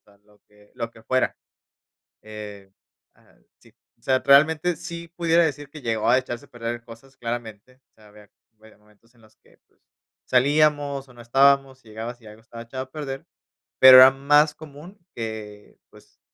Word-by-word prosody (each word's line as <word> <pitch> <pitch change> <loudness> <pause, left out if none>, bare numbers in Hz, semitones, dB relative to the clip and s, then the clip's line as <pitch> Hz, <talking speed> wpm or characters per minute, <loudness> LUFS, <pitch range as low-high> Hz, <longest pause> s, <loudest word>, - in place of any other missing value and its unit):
sea 100 -1 -25
lo 105 -1 -27
que 105 0 -25
lo 115 -1 -5
que 110 -1 -19
fuera. 130 +3 -1 0.9
Eh 105 -2 -11 0.4
ah, - - -28 0.2
sí, - - -24 0.2
o - - -38
sea, 130 -1 +1
realmente 155 +5 +3
sí 170 +2 -9
pudiera 170 0 +1
decir 145 -2 -4
que 150 -1 -12
llegó 115 -2 -2
a 125 +2 +5
echarse 120 -2 -7
a - - -32
perder 120 0 -6
cosas 120 +4 -16
claramente, 120 +1 -8
o - - -52
sea, 110 -1 -21
había, 105 0 -18
a - - -26 0.3
ver, 110 -1 -19
momentos 105 +2 -28
en - - -25
los 110 0 -23
que, - - -28
pues, - - -40 0.4
salíamos 145 +1 +1
o 125 - -18
no 120 - -16
estábamos, 135 +2 +2
llegabas 115 +2 -9
y 110 - -19
algo 105 +1 -14
estaba 115 0 -11
echado 130 +3 -7
a 130 - -26
perder, 135 -3 -7 0.5
pero 130 -1 +10
era 130 +1 +10
más 145 +3 +2
común 155 +6 -14 0.2
que, 110 -2 -8
pues, - - -22
125 Hz, 185 wpm, -23 LUFS, 110-140 Hz, 0.9 s, pero